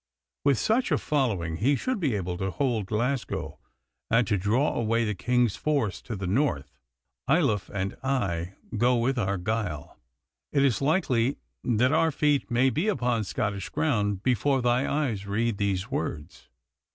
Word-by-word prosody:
With 140 Hz, -3 st, +3 dB
such 230 Hz, -, +1 dB
a -, -, +4 dB
following 100 Hz, -, -1 dB
he 135 Hz, +9 st, +2 dB
should 255 Hz, -, -2 dB
be 140 Hz, -, 0 dB
able 90 Hz, -3 st, -2 dB
to 95 Hz, -, -1 dB
hold 115 Hz, -2 st, -1 dB
Glasgow, 120 Hz, +5 st, -2 dB, 0.5 s
and 115 Hz, +1 st, +4 dB
to 105 Hz, -, +1 dB
draw 105 Hz, +9 st, +1 dB
away 115 Hz, 0 st, +1 dB
the 105 Hz, -, -1 dB
King's 120 Hz, +2 st, +1 dB
force 140 Hz, -11 st, -1 dB
to 115 Hz, -, -6 dB
the 95 Hz, -1 st, -4 dB
north. 105 Hz, -, -1 dB, 0.5 s
Ayloffe 135 Hz, -, +2 dB
and 95 Hz, -1 st, -3 dB
I 95 Hz, -10 st, -1 dB, 0.2 s
go 120 Hz, +3 st, +3 dB
with 125 Hz, +2 st, +1 dB
Argyle. 100 Hz, -, -2 dB, 0.5 s
It 140 Hz, -1 st, +3 dB
is 125 Hz, -4 st, +1 dB
likely 135 Hz, -5 st, +1 dB, 0.3 s
that 125 Hz, +2 st, +2 dB
our 165 Hz, -, +4 dB
feet 145 Hz, 0 st, +1 dB
may 130 Hz, +2 st, +3 dB
be 160 Hz, +10 st, -1 dB
upon 120 Hz, -, 0 dB
Scottish 100 Hz, -2 st, -2 dB
ground 105 Hz, -10 st, 0 dB
before 130 Hz, +2 st, +2 dB
thy 125 Hz, +2 st, +2 dB
eyes 120 Hz, -10 st, -1 dB
read 110 Hz, +1 st, 0 dB
these 100 Hz, +2 st, -1 dB
words. 80 Hz, -, -5 dB
120 Hz, 155 wpm, -27 LUFS, 100-135 Hz, 0.5 s, a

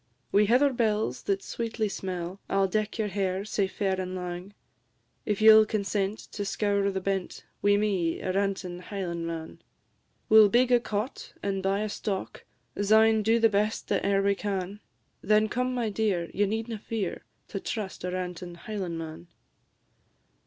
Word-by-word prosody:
"Wi' 205 Hz, +1 st, +5 dB
heather 260 Hz, +6 st, +4 dB
bells, 215 Hz, -, 0 dB
that 195 Hz, -1 st, -1 dB
sweetly 225 Hz, -2 st, -2 dB
smell, 185 Hz, -1 st, -5 dB
I -, -, -1 dB
'll 195 Hz, 0 st, +4 dB
deck 215 Hz, +4 st, -1 dB
your 215 Hz, -2 st, -1 dB
hair, 190 Hz, 0 st, -1 dB
sae 205 Hz, -2 st, 0 dB
fair 190 Hz, -1 st, -1 dB
and 185 Hz, 0 st, -4 dB
lang, 180 Hz, +2 st, -6 dB, 0.7 s
If 210 Hz, 0 st, 0 dB
ye 220 Hz, 0 st, +10 dB
'll 220 Hz, 0 st, +8 dB
consent 205 Hz, -1 st, -1 dB
to 205 Hz, -, -4 dB
scour 200 Hz, 0 st, +1 dB
the 190 Hz, -1 st, -2 dB
bent 190 Hz, -1 st, -3 dB, 0.2 s
Wi' 205 Hz, 0 st, +4 dB
me, 190 Hz, -6 st, 0 dB
a 185 Hz, -, -2 dB
rantin' 195 Hz, -2 st, -1 dB
Highlandman. 170 Hz, -4 st, -5 dB, 0.7 s
We 220 Hz, -, +8 dB
'll 210 Hz, -2 st, +8 dB
big 250 Hz, +4 st, +3 dB
a 245 Hz, -, +6 dB
cot, 215 Hz, +1 st, -4 dB
and 195 Hz, -1 st, -1 dB
buy 195 Hz, +1 st, +1 dB
a 215 Hz, -, -1 dB
stock, 200 Hz, -2 st, -4 dB, 0.4 s
Syne 220 Hz, +1 st, +5 dB
do 225 Hz, +2 st, +3 dB
the 225 Hz, -, +6 dB
best 210 Hz, +1 st, -1 dB
that 200 Hz, -, +1 dB
e'er 195 Hz, 0 st, +2 dB
we 200 Hz, 0 st, +3 dB
can; 195 Hz, 0 st, -3 dB, 0.4 s
Then 215 Hz, +2 st, +3 dB
come, 250 Hz, +3 st, -1 dB
my 235 Hz, -3 st, -1 dB
dear, 195 Hz, -5 st, 0 dB
ye 205 Hz, +1 st, +2 dB
needna 225 Hz, +1 st, -3 dB
fear 210 Hz, -3 st, -4 dB, 0.3 s
To 195 Hz, -, -4 dB
trust 200 Hz, -3 st, -5 dB
a 180 Hz, -, -2 dB
rantin' 180 Hz, -1 st, -5 dB
Highlandman." 170 Hz, -4 st, -5 dB
200 Hz, 165 wpm, -28 LUFS, 185-215 Hz, 0.7 s, ye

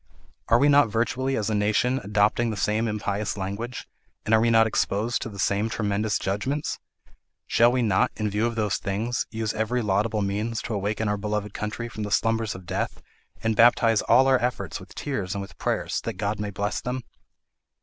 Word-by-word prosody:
Are 115 Hz, -, +5 dB
we 140 Hz, +4 st, +4 dB
not 145 Hz, -4 st, +5 dB
virtually 130 Hz, +4 st, 0 dB
as 110 Hz, 0 st, -1 dB
a -, -, +1 dB
nation 110 Hz, +5 st, +2 dB
adopting 105 Hz, +3 st, +2 dB
the 110 Hz, -, -3 dB
same 110 Hz, +3 st, +1 dB
impious 105 Hz, -1 st, -2 dB
language, 100 Hz, +6 st, -5 dB, 0.4 s
and 110 Hz, -, +1 dB
are 110 Hz, -, +6 dB
we 115 Hz, -, +3 dB
not 115 Hz, -1 st, +5 dB
exposed 110 Hz, +1 st, 0 dB
to -, -, -4 dB
the 100 Hz, -, -10 dB
same 100 Hz, +2 st, +1 dB
tremendous 105 Hz, -1 st, 0 dB
judgments? 125 Hz, +10 st, -2 dB, 0.7 s
Shall 120 Hz, +1 st, +4 dB
we 125 Hz, -1 st, +1 dB
not, 95 Hz, -4 st, +3 dB
in 110 Hz, 0 st, -1 dB
view 105 Hz, +3 st, 0 dB
of 115 Hz, -, -4 dB
those 105 Hz, -3 st, 0 dB
things, 110 Hz, +5 st, -2 dB
use 110 Hz, -1 st, -2 dB
every 115 Hz, +3 st, -1 dB
laudable 105 Hz, +1 st, +1 dB
means 105 Hz, +3 st, -2 dB
to 115 Hz, -, -4 dB
awaken 105 Hz, +2 st, -1 dB
our 105 Hz, 0 st, 0 dB
beloved 105 Hz, 0 st, -3 dB
country 110 Hz, +3 st, -4 dB
from 110 Hz, -, -7 dB
the 105 Hz, -, -3 dB
slumbers 115 Hz, 0 st, +1 dB
of 95 Hz, -1 st, -10 dB
death, -, -, -3 dB, 0.4 s
and 110 Hz, 0 st, +1 dB
baptize 115 Hz, -1 st, +5 dB
all 130 Hz, +3 st, +5 dB
our 130 Hz, -2 st, +4 dB
efforts 115 Hz, -8 st, -2 dB
with -, -, -14 dB
tears 105 Hz, -10 st, -3 dB
and 100 Hz, -, -2 dB
with 100 Hz, -, -13 dB
prayers, -, -, -1 dB
that -, -, -4 dB
God 100 Hz, +2 st, -2 dB
may 105 Hz, -1 st, -2 dB
bless 100 Hz, +1 st, -2 dB
them? 125 Hz, 0 st, -3 dB
110 Hz, 200 wpm, -25 LUFS, 105-115 Hz, 0.7 s, are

